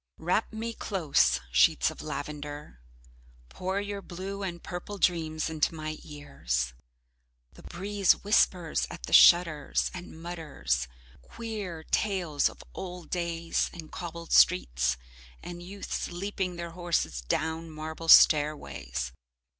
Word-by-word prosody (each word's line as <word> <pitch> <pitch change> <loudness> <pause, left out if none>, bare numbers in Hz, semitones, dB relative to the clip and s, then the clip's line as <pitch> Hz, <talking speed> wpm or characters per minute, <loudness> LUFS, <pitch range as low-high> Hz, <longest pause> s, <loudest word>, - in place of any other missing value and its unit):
Wrap 180 +6 0
me 225 +1 -4
close, 185 -10 +2
sheets 60 -1 +4
of - - -10
lavender. 145 - -6 0.7
Pour 190 - -2
your 205 0 -4
blue 195 +2 -6
and 175 -3 -5
purple 180 +3 -6
dreams 160 -4 +1
into 160 0 0
my 155 0 -5
ears. 60 - -3 0.8
The - - -15
breeze 195 +2 +1
whispers 180 -5 +2
at - - -9
the - - -5
shutters 165 -5 +5
and 175 -3 -9
mutters 145 - -2 0.3
queer 205 - -6
tales 175 -7 +1
of - - -13
old 180 -2 -7
days, 170 -1 -1
and 160 -3 -10
cobbled 170 -1 -7
streets, - - +4 0.5
and 175 0 -7
youths 195 +3 -5
leaping 185 0 -3
their 170 -1 -6
horses 165 - -1
down 160 - -2
marble 160 +1 -7
stairways. 70 - +4
165 Hz, 120 wpm, -29 LUFS, 150-180 Hz, 0.8 s, shutters